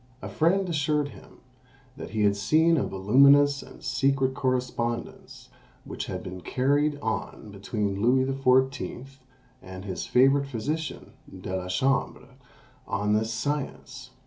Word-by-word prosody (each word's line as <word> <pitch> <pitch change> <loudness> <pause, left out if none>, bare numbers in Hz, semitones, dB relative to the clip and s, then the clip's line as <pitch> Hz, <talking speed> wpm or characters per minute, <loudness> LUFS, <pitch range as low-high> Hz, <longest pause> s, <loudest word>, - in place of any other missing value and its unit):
A - - -7
friend 185 +4 +1
assured 150 -3 0
him 100 -7 -16 0.5
that - - -8
he 110 -1 -1
had 100 -1 +3
seen 160 +11 +3
a 135 - 0
voluminous 140 +8 +4
and - - -14
secret 135 +1 +1
correspondence 125 -3 -3 0.4
which - - -6
had - - -5
been 90 0 -8
carried 145 +7 +1
on 110 -2 -4
between 100 0 -3
Louis 130 +3 +3
XIV. 135 0 0 0.4
and 95 +1 -10
his 95 -3 -5
favourite 135 +2 +3
physician, 145 +5 -4 0.2
De 95 0 -6
la 90 -1 -4
Chambre, 125 +5 -1 0.6
on 105 +1 0
this 110 +1 0
science. 130 +1 -4
130 Hz, 130 wpm, -26 LUFS, 105-140 Hz, 0.6 s, voluminous